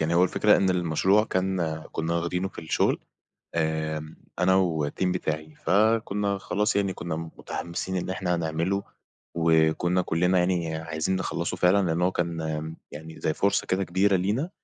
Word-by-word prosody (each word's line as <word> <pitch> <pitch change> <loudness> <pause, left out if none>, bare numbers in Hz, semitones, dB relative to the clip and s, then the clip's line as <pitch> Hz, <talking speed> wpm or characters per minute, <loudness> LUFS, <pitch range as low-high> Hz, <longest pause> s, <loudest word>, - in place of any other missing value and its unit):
يعني 80 +2 +1
هو 90 +1 +5
الفكرة 105 +3 +4
إن 95 -1 +2
المشروع 90 +4 +2
كان 90 -6 -1
كُنا 80 +1 -1
واخدينه 90 +3 -1
في - - -9
الشغل، 80 - +1 0.6
آآ، 80 -1 -2 0.2
أنا 95 +1 +4
و 80 -6 +1
الTeam - - -4
بتاعي، 80 -4 -3
فكُنا 105 0 +2
خلاص 105 +3 -1
يعني 100 -2 +1
كُنا 85 -2 -4
متحمسين 85 +3 -5
إن 90 - -2
إحنا 90 -2 -1
هنعمله 85 +4 -1 0.5
وكُنا 80 +2 +3
كُلّنا 90 +2 +2
يعني 90 -3 0
عايزين 80 +3 -2
نخلّصه 90 -1 -2
فعلًا، 90 +2 +4
لأن 85 +2 0
هو 90 - +3
كان 85 -2 -2
آمم 80 0 -4
يعني 80 +2 -9
زي 80 - 0
فرصة 100 +4 +1
كده 95 +1 +1
كبيرة 95 +2 +2
لينا 105 - 0
90 Hz, 160 wpm, -26 LUFS, 80-95 Hz, 0.6 s, هو